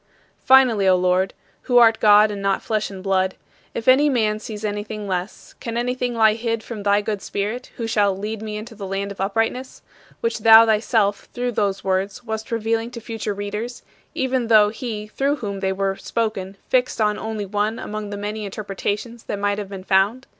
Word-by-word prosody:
Finally, 255 -7 +5
O 185 - +6
Lord 185 +1 +1 0.3
who 245 - +5
art 225 -2 +6
God 210 0 +6
and 200 -1 -5
not 195 -1 0
flesh 215 -1 -1
and 190 -2 -9
blood 190 -1 +1 0.4
if 230 - -4
any 275 +3 +6
man 215 -5 +1
sees 215 -1 -6
anything 210 0 -4
less, 185 +1 -4
can 230 -1 -4
anything 250 0 -1
lie 220 -1 +5
hid 230 0 -2
from 225 -3 -7
"thy 200 0 +3
good 205 -1 -3
Spirit" 215 +7 -4
who 230 - -4
shall 205 -3 +1
"lead 215 +2 -4
me 215 -1 -5
into 220 +2 -8
the 200 -3 -7
land 195 +1 -3
of 195 - -7
uprightness," 225 +6 -2 0.4
which 460 - -1
thou 225 +1 +8
thyself, 215 -2 +1
through 245 0 -2
those 200 -3 -1
words, 195 +4 -1
wast 220 -1 -5
revealing 230 0 -1
to 245 -1 -8
future 225 -2 -4
readers, 210 +4 -5 0.3
even 260 -2 0
though 215 -2 +6
he 215 -1 -5
through 275 +6 -1
whom 200 -7 -5
they 190 0 0
were 195 0 -1
spoken 200 -3 -3
fixed 255 -1 +1
on 210 -1 +1
only 220 -2 -4
one 210 +3 -1
among 210 -1 -5
the 205 - -5
many 210 +1 -4
interpretations 210 +3 -4
that 205 - -3
might 205 0 0
have 200 -2 -6
been 195 -2 -8
found? 200 +7 +2
215 Hz, 195 wpm, -22 LUFS, 200-230 Hz, 0.4 s, thou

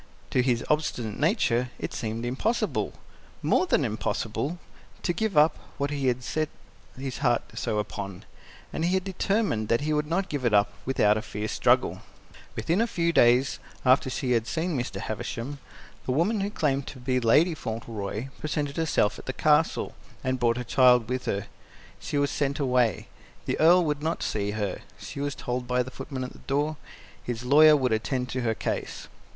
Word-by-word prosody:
To 125 - +3
his 120 -2 +1
obstinate 125 -8 -1
nature 130 - +2
it - - -5
seemed 115 +1 -3
impossible 175 - -1 0.5
more 370 - +3
than 150 - +2
impossible 115 +7 -2 0.5
to 175 - +1
give 215 -2 -1
up 150 +2 +6 0.2
what 140 0 -1
he 140 -2 -1
had 125 0 0
so - - -5
set 155 - -1 0.5
his 135 -1 -5
heart 120 -4 +2 0.2
upon. 100 -3 -3 0.5
And 160 - -2
he 180 +2 +2
had 190 - +1
determined 195 - 0
that 115 +4 +2
he 155 +1 0
would 150 0 0
not 185 +4 0
give 145 -6 -3
it 115 -4 +3
up 100 0 +3
without 105 -5 +3
a - - -2
fierce 105 -1 -4
struggle. - - +2 0.5
Within 165 - +1
a 230 - +2
few 170 -5 0
days 125 +1 +4 0.3
after 130 +1 +4
she 130 0 -2
had 115 -1 +2
seen 165 +2 -1
Mr. 125 -2 -3
Havisham, 135 +5 -4 0.5
the - - +1
woman 185 - +2
who 200 - -1
claimed 140 -9 0
to 145 - -8
be 125 0 0
Lady 150 +9 +4
Fauntleroy 110 -2 -5
presented 145 -2 -2
herself 160 -10 +1
at - - -13
the - - 0
Castle, - - +2 0.3
and 130 0 0
brought 120 -1 +2
her 125 - -2
child 125 -1 +4
with 125 0 -2
her. 100 0 -1 0.5
She 145 - -3
was 145 0 +2
sent 140 -1 0
away. 125 - +1 0.4
The - - -1
Earl 175 +2 +6
would 150 -1 -1
not 160 +2 -1
see 105 -1 -1
her, 100 -3 -2 0.2
she - - -8
was 145 0 -2
told 125 0 -3
by 125 0 +2
the 130 - -9
footman 135 0 -5
at 125 - -5
the - - -15
door; 145 +2 -1 0.5
his 120 -1 -4
lawyer 150 +4 +7
would 130 -3 0
attend 125 +3 -1
to 130 - -2
her 115 -2 0
case. - - -4
130 Hz, 185 wpm, -27 LUFS, 120-155 Hz, 0.5 s, lawyer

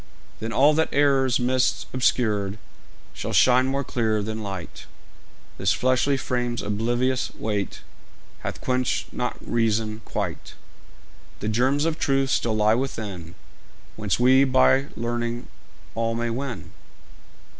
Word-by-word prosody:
Then 110 +1 -4
all 145 +6 +5
that 160 +1 +1
error's 135 -3 +3
mists 125 +1 +1
obscured 110 -6 +1 0.6
Shall - - -5
shine 130 +1 +5
more 135 +1 -1
clear 110 -4 0
than 110 +1 -4
light, 95 -4 -7 0.7
This - - +2
fleshly 130 +2 +2
frame's 120 -2 -2
oblivious 120 +5 0
weight 105 -3 -3 0.6
Hath - - -6
quenched 125 -1 -1
not - - -3
reason 110 -1 0
quite; - - -5 0.8
The 105 - -2
germs 130 +7 +2
of 160 -1 -1
truth 135 -1 +1
still 115 -2 +1
lie 105 0 +4
within, 100 -9 -4 0.6
Whence 105 0 -1
we 130 +2 +6
by 130 +1 +4
learning 120 0 -3 0.5
all 115 0 -1
may 120 0 -1
win. 125 +1 -5
120 Hz, 125 wpm, -24 LUFS, 110-130 Hz, 0.8 s, we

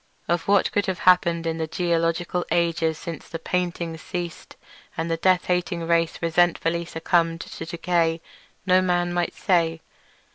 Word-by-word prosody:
Of 170 -1 0
what 200 0 +3
could 205 -1 0
have 190 -2 -1
happened 170 -2 +4
in 165 0 -2
the 160 - -1
geological 170 +1 0
aeons 165 -2 +1
since 165 -2 -8
the 165 - -4
paintings 170 -1 -3
ceased 175 -2 -6 0.4
and 165 +1 -2
the 165 - 0
death 185 +1 +2
hating 180 -1 -1
race 165 -1 +1
resentfully 170 0 +2
succumbed 165 0 0
to 165 - -8
decay, 170 -1 0 0.5
no 185 -1 +5
man 175 -1 0
might 175 -1 -1
say. 165 -3 +1
170 Hz, 150 wpm, -24 LUFS, 165-180 Hz, 0.5 s, no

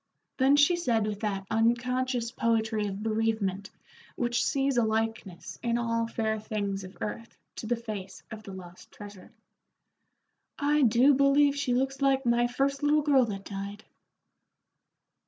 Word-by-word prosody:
Then 270 +1 +4
she 295 +5 +4
said 235 -10 +1
with 210 -1 -4
that 200 -3 -3
unconscious 240 +1 0
poetry 220 -3 0
of 200 +1 -5
bereavement 215 -3 -1 0.5
which 240 -1 0
sees 275 -1 0
a 240 - +4
likeness 220 -4 -3
in 235 -1 0
all 230 -1 -1
fair 220 -1 -2
things 200 -2 -3
of 185 +1 -11
earth 230 +2 -6 0.2
to 220 - -6
the 240 - +1
face 215 -5 -7
of 220 -1 -7
the 200 - -10
lost 180 -2 -12
treasure, 205 -2 -12 1.3
"I 295 +1 +2
do 250 +3 +5
believe 280 +1 +4
she 285 -4 0
looks 270 +2 -1
like 270 -1 +2
my 240 0 +3
first 275 +3 -1
little 295 +1 +3
girl 275 -4 +4
that 195 -3 -6
died." 200 +1 -7
230 Hz, 150 wpm, -28 LUFS, 210-265 Hz, 1.3 s, do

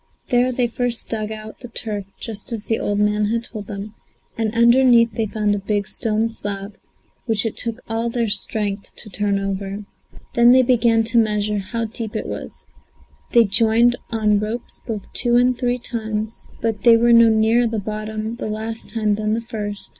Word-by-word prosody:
There 250 +1 +3
they 245 0 +1
first 240 0 -2
dug 215 -1 -3
out 215 0 -8
the 245 - -9
turf 215 -4 -4
just 220 0 -5
as 220 -2 -4
the 225 - 0
old 205 - -1
man 210 0 +2
had 230 +2 -1
told 215 -4 -8
them, 205 +1 -6 0.4
and 220 -2 -1
underneath 235 0 +5
they 225 -1 -2
found 210 0 0
a 205 - -1
big 205 0 -1
stone 220 0 0
slab, 200 -2 -6 0.5
which 220 -1 +2
it 225 - -2
took 230 -2 -2
all 225 +1 -1
their 235 -1 -1
strength 205 -1 -2
to 210 - -9
turn 200 +1 0
over. 195 +1 -4 0.5
They 235 - +2
then 255 +1 +7
began 235 -2 +3
to 230 +1 +2
measure 210 -1 +1
how 230 +4 -3
deep 225 0 -5
it 215 - -2
was; - - -7 0.7
they 235 - +7
joined 230 +3 +4
on 215 -2 +2
ropes 220 +3 -5
both 215 -4 -5
two 240 -1 +2
and 250 +1 +4
three 245 0 0
times, 220 -2 -4
but 225 -2 -1
they 235 -1 +7
were 235 +1 +4
no 230 0 +7
nearer 225 +2 +3
the 225 0 -2
bottom 215 +2 -4
the 215 - -4
last 220 +1 -3
time 215 -2 0
than 215 +1 0
the 230 - -2
first. 210 -3 -5
220 Hz, 190 wpm, -21 LUFS, 210-235 Hz, 0.7 s, then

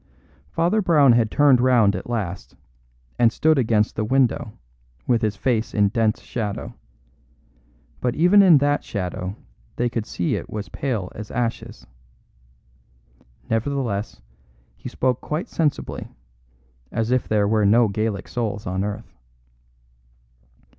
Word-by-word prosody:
Father 175 +6 +1
Brown 150 -8 +5
had 115 -2 +3
turned 140 -3 +4
round 120 -5 +4
at - - -7
last, 100 -6 -4 0.6
and 115 -1 +5
stood 155 +2 +2
against 110 -3 +1
the 110 - -1
window, 120 -2 0 0.5
with 120 -2 +2
his 105 -2 0
face 115 +1 -1
in 105 -2 +3
dense 110 0 0
shadow; 105 -4 -4 1.3
but 125 -1 -1
even 180 +6 +5
in 180 -6 +7
that 145 +1 +1
shadow 95 -1 -4 0.4
they 120 0 0
could 115 -1 -4
see 85 - -2
it - - -4
was 105 -1 -6
pale 115 -10 -3
as 105 -1 -8
ashes. 120 -1 -4 1.6
Nevertheless, 115 -3 -2 0.6
he - - -8
spoke 130 -1 -1
quite 155 +3 -3
sensibly, 155 -4 -2 0.8
as 115 +1 -1
if 130 -1 +1
there 105 -2 +2
were 110 0 +2
no 115 +3 +5
Gaelic 105 -1 -3
souls 105 -4 -3
on 95 0 -2
earth. 105 0 -6
115 Hz, 130 wpm, -22 LUFS, 105-130 Hz, 1.6 s, in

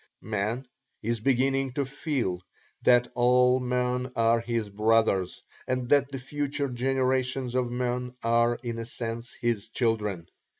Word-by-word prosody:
Man 110 +4 -2 0.4
is 115 +1 -1
beginning 135 +2 +1
to 140 +1 -1
feel 130 - -2 0.4
that 120 0 +4
all 125 +1 +4
men 125 0 -1
are 115 0 +3
his 115 -2 -2
brothers, 105 -2 +1 0.2
and 130 -1 -1
that 140 -1 +4
the 135 - -4
future 140 +1 -3
generations 130 0 0
of 125 -1 0
men 125 0 -2
are 120 +1 +3
in 115 -1 -3
a 115 - -4
sense 115 0 -5
his 115 -2 -2
children. 105 -7 -1
125 Hz, 135 wpm, -27 LUFS, 115-130 Hz, 0.4 s, that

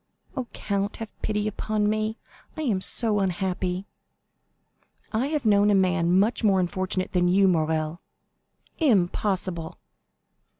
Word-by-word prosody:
"Oh, 260 -2 -2
count, 200 0 -2
have 225 -2 -7
pity 210 0 -1
upon 215 0 -1
me. 215 +1 -1 0.4
I 315 - -2
am 210 -9 0
so 215 0 +1
unhappy." 185 0 -1 1.3
"I 235 +5 +1
have 300 -4 -2
known 205 -1 +4
a 205 - +4
man 180 -2 +2
much 215 +5 +2
more 195 -3 +4
unfortunate 185 +1 -1
than 180 -1 +2
you, 195 +2 +4
Morrel." 160 -1 0 0.8
"Impossible!" 185 - 0
195 Hz, 125 wpm, -25 LUFS, 180-215 Hz, 1.3 s, known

